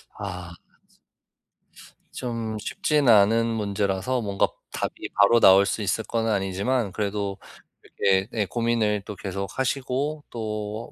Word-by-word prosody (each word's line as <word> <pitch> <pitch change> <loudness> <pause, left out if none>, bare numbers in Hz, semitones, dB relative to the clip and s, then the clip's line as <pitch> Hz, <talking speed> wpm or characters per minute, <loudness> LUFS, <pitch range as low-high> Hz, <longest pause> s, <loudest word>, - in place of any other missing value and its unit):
아. 90 -4 -7 1.6
좀 115 -3 -4
쉽지는 145 +3 +2
않은 110 +2 +5
문제라서 105 +2 -1
뭔가 100 -3 +1 0.2
답이 - - -4
바로 105 +4 +5
나올 95 -2 +7
수 105 - -2
있을 105 +2 0
거는 115 -1 -1
아니지만 100 +3 0
그래도 100 -1 -2 0.4
그게 95 0 +1
네 110 -3 0
고민을 115 -2 0
또 105 - -7
계속 100 0 -5
하시고 135 +3 -1
또 110 -1 -5
105 Hz, 240 characters per minute, -25 LUFS, 100-115 Hz, 1.6 s, 나올